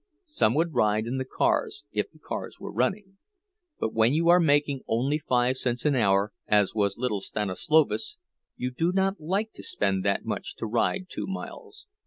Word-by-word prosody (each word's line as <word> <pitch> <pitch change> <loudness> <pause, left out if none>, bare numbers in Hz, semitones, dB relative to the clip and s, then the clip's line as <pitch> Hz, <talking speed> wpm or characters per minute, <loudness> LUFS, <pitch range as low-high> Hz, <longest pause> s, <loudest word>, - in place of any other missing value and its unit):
Some 305 - +2
would 165 +1 +1
ride 110 -2 +2
in 125 +3 -2
the 130 - -2
cars, - - 0
if - - -1
the - - -22
cars - - -6
were - - -7
running; 190 - -2 0.6
but 110 - -2
when 115 +5 +3
you 165 +1 +2
are 175 +1 +7
making 145 -4 +2
only 135 +7 +1
five 125 -2 +1
cents 125 0 -1
an 150 - +4
hour, 100 -4 +2
as 105 -2 +3
was 100 -2 0
little 115 -5 -1
Stanislovas, 150 - 0 0.4
you 125 0 -3
do 165 +7 0
not 195 +1 +1
like 195 +7 -1
to - - -11
spend 95 -2 -1
that 100 0 0
much - - -4
to - - -4
ride 120 - 0
two - - -5
miles. 425 - -8
130 Hz, 185 wpm, -27 LUFS, 110-170 Hz, 0.6 s, are